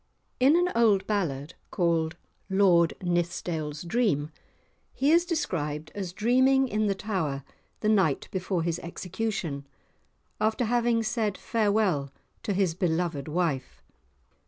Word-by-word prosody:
In 270 +5 +5
an 355 +1 +2
old 210 -5 +4
ballad 165 -8 -2 0.2
called 170 -3 0 0.3
"Lord 185 -4 +4
Nithsdale's 170 -3 -2
Dream," 170 - 0 0.6
he 280 +3 +2
is 340 +1 +5
described 155 - -2
as 190 -4 -4
dreaming 260 +6 +3
in 215 -2 0
the 200 - +1
Tower 165 -10 -2 0.4
the 215 - +1
night 190 -10 +2
before 185 -2 -1
his 170 0 -1
execution, 175 -4 -4 0.7
after 220 +3 +1
having 235 0 +2
said 215 -2 -1
farewell 205 -10 +1 0.3
to 205 - -2
his 190 -3 +1
beloved 165 -4 -1
wife. 155 -5 -2
190 Hz, 120 wpm, -27 LUFS, 160-220 Hz, 0.7 s, In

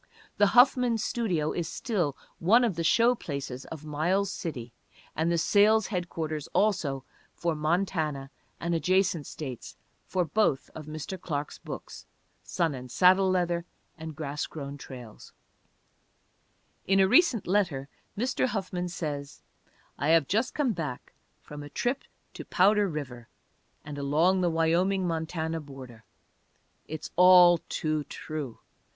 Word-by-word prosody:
The 205 - +5
Huffman 245 -2 +5
Studio 190 -9 -1
is 170 -1 -3
still 180 - -2 0.2
one 225 +9 +5
of 225 -7 +1
the 165 - -2
show 235 +8 +4
places 140 - -6
of 155 -1 -9
Miles 175 +7 0
City, 125 -11 -6 0.4
and 160 +2 +1
the 170 - +2
sales 210 +5 +4
headquarters 160 -5 -3
also 150 -11 +1 0.3
for 170 -1 -1
Montana 155 -3 -1 0.3
and 170 +1 -2
adjacent 185 -1 +1
states 130 -6 -7 0.3
for 180 -2 0
both 160 -4 0
of 155 -1 -9
Mr. 155 +4 -6
Clark's 145 -3 -4
books, - - -9 0.3
Sun 165 -4 -1
and 125 -1 -8
Saddle 185 +6 +5
Leather 175 -2 0 0.3
and 160 -2 -8
Grass 150 0 -4
Grown 140 -2 -7
Trails. 125 -5 -11 1.5
In 195 0 +4
a 190 - +5
recent 280 - +4
letter 175 -9 0 0.3
Mr. 255 +3 0
Huffman 185 -5 -3
says, 145 -5 -5 0.6
"I 140 - 0
have 160 -3 +4
just 225 +6 0
come 275 -6 +1
back 155 -8 -6 0.3
from 150 0 -9
a 145 - -9
trip 245 - -2 0.3
to - - -7
'Powder 205 +2 +3
River' 130 -8 -6 0.6
and 145 -1 -6
along 160 +7 +2
the 175 - +2
Wyoming 175 +4 +1
Montana 160 -1 -2
border. 130 -7 -11 0.8
It's 155 0 -6
all 180 -1 +8
too 155 -1 -1
true! 150 -6 -6
165 Hz, 135 wpm, -28 LUFS, 145-190 Hz, 1.5 s, all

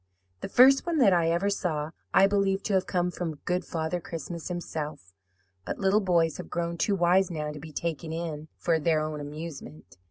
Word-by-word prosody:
The - - -6
first 270 - +6
one 335 -2 0
that 220 -9 +5
I 170 -2 +3
ever 175 +4 +1
saw 160 -6 -2 0.2
I 195 - +6
believed 195 -1 +1
to 205 - 0
have 190 -1 +2
come 180 -1 0
from 170 -3 -4
Good 180 0 0
Father 160 +2 -2
Christmas 165 0 -6
himself; 155 - -5 0.5
but - - -4
little 200 +2 +3
boys 170 -4 +2
have - - -8
grown 170 0 -2
too 200 +4 +1
wise 180 +1 +3
now 150 -3 -3
to 150 - -8
be 155 +2 -10
taken 160 +1 -3
in 160 -2 -4
for 165 -2 +1
their 155 0 +2
own 155 -1 -3
amusement. 145 - -9
170 Hz, 195 wpm, -28 LUFS, 155-190 Hz, 0.5 s, first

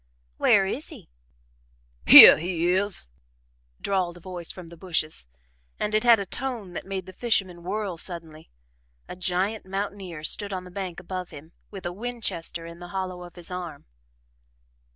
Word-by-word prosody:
"Where 200 -2 +4
is 260 +10 -4
he?" - - -13 1.0
"Hyeh - - +12
he 175 +1 0
is!" 190 - -1 0.7
drawled 185 -3 -1
a - - -12
voice 175 -1 -7
from 180 -3 -11
the 170 - -12
bushes, 165 - -2 0.5
and 210 - -2
it 215 - +2
had 235 -2 +6
a 200 - -3
tone 230 -5 -5
that - - -7
made 190 -2 -4
the 185 - -11
fisherman 190 -6 0
whirl 195 0 -3
suddenly. 165 -3 -7 0.6
A - - -8
giant 185 +4 -1
mountaineer 195 -4 -5
stood 200 +5 0
on 185 -1 -4
the 180 - -12
bank 185 -2 -5
above 185 0 -6
him, 155 +3 -12 0.2
with 195 -3 -10
a 175 - -3
Winchester 210 -7 -4
in 170 0 -10
the 175 - -9
hollow 185 -1 -5
of 175 -1 -11
his 175 0 -6
arm. 175 -5 -7
185 Hz, 165 wpm, -25 LUFS, 170-195 Hz, 1.0 s, Hyeh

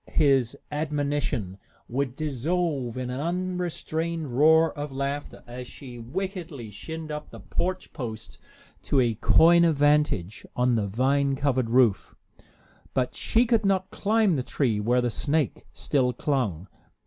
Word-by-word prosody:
His 135 -3 +3
admonition 145 - -2 0.3
would 130 0 -2
dissolve 150 -3 -1
in 125 -1 -3
an 125 - -4
unrestrained 170 -3 -2
roar 160 +3 +5
of 145 -1 -5
laughter 140 +2 -4
as 125 +1 -8
she 125 -3 -10
wickedly 165 - -5
"shinned" 160 +9 -7
up 150 0 -6
the - - -11
porch 185 +1 -3
post 115 -4 -7 0.4
to 140 - +1
a 120 -3 +3
coign 170 +9 +5
of 165 -2 +3
vantage 145 - +2
on 125 0 +2
the 110 -3 +1
vine 135 +6 +1
covered 130 -4 0
roof. 120 -5 +3 0.8
But 125 -2 0
she 235 +2 +2
could 230 -2 +2
not 190 -1 +1
climb 210 -5 +2
the - - 0
tree 125 -4 0
where 120 +4 +2
the 120 -1 0
snake 145 +1 -1
still 125 -3 0
clung. 110 - -1
140 Hz, 140 wpm, -26 LUFS, 125-160 Hz, 0.8 s, roar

